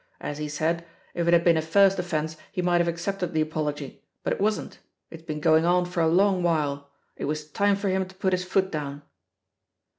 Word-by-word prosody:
As 145 0 -5
he 150 0 -3
said, 160 +3 -1 0.3
if 170 -1 -1
it - - +5
had 170 0 +5
been 170 -2 +4
a - - +2
first 195 +4 +4
offence 160 -3 -2 0.2
he 180 - -2
might 175 0 +3
have 170 - 0
accepted 175 +1 -2
the 155 - +2
apology, 150 -3 -3 0.2
but - - 0
it - - -5
wasn't; 215 +1 -1 0.3
it's 165 - -10
been 155 -2 -5
going 160 +1 +4
on 180 +1 +3
for 175 -1 -2
a 165 - +3
long 185 +2 +3
while, 145 -4 0 0.3
it - - -3
was 150 +1 -3
time 200 +6 +2
for 200 0 -3
him 190 0 0
to 185 - -16
put 190 0 0
his 180 0 0
foot 190 +1 0
down. 145 -2 -5
170 Hz, 220 wpm, -26 LUFS, 155-185 Hz, 0.3 s, it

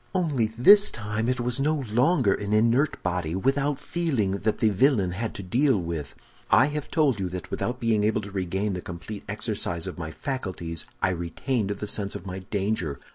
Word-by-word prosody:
"Only 150 -11 +1
this 205 - +7
time 110 +1 -2
it 125 -1 0
was 120 +1 -1
no 150 0 +1
longer 125 - +4
an 105 0 -3
inert 115 +7 +2
body, 90 -2 -1
without 135 +7 +1
feeling, 135 - -1
that 110 - 0
the 110 - +3
villain 105 -3 +3
had 110 +5 -4
to 100 - -6
deal 125 +5 +2
with. 85 -4 -5 0.3
I - - +6
have 150 -1 -4
told 145 -9 +2
you 95 -2 -1
that 90 0 -7
without 125 +1 -2
being 115 -3 +2
able 110 0 +2
to 100 0 -9
regain 95 +2 -1
the 90 - -4
complete 90 +4 -7
exercise 105 -5 -3
of 95 -2 -6
my 80 -2 -4
faculties, 90 - -4 0.2
I - - +4
retained 95 - -2
the 105 0 -3
sense 100 -1 -2
of 85 - -7
my 95 0 -5
danger. 95 -6 -2
105 Hz, 190 wpm, -26 LUFS, 95-130 Hz, 0.3 s, this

